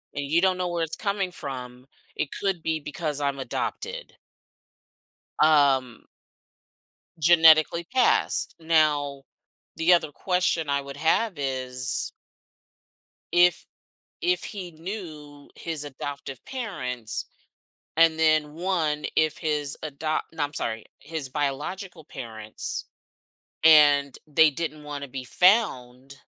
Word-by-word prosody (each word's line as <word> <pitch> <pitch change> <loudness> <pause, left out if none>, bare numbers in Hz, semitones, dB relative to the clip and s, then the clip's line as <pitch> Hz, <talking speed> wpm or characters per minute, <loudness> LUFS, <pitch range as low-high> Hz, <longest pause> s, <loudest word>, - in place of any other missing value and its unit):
and 145 0 -2
you 165 +5 +2
don't 185 -1 +3
know 180 -1 -1
where 170 -1 -1
it's 160 - -4
coming 200 -3 -2
from, 130 -5 -7 0.3
it 145 - -2
could 195 -4 0
be 160 -1 0
because 150 0 -4
I'm 140 -1 -1
adopted." 475 - -4 1.3
Um 140 -6 +3 1.2
Genetically 160 0 +6
passed. 250 +6 +1
Now, 150 -4 +1 0.5
the 170 +2 +4
other 160 -4 +2
question 180 -4 0
I 140 0 +2
would 140 0 -9
have 165 +4 +1
is 130 -2 -2 1.2
if 175 0 +4 0.6
if 360 +1 +1
he 185 -5 -7
knew 155 -5 -8
his 160 -3 -4
adoptive 140 -2 -7
parents, 125 - -4 0.7
and 165 -1 +5
then 155 -2 +3
1, 165 -4 -1
if 155 -1 +2
his 150 -3 -2
adopt 155 +1 -2
no, 160 - -3
I'm 145 - -5
sorry 110 -1 -2 0.2
his 155 -3 -5
biological 155 +5 -3
parents, 110 -7 -6 0.8
and 145 -3 +6
they 155 +1 +5
didn't 155 0 -5
wanna 145 -1 -6
be 130 0 -6
found, 135 - +2
155 Hz, 115 wpm, -26 LUFS, 140-170 Hz, 1.3 s, Genetically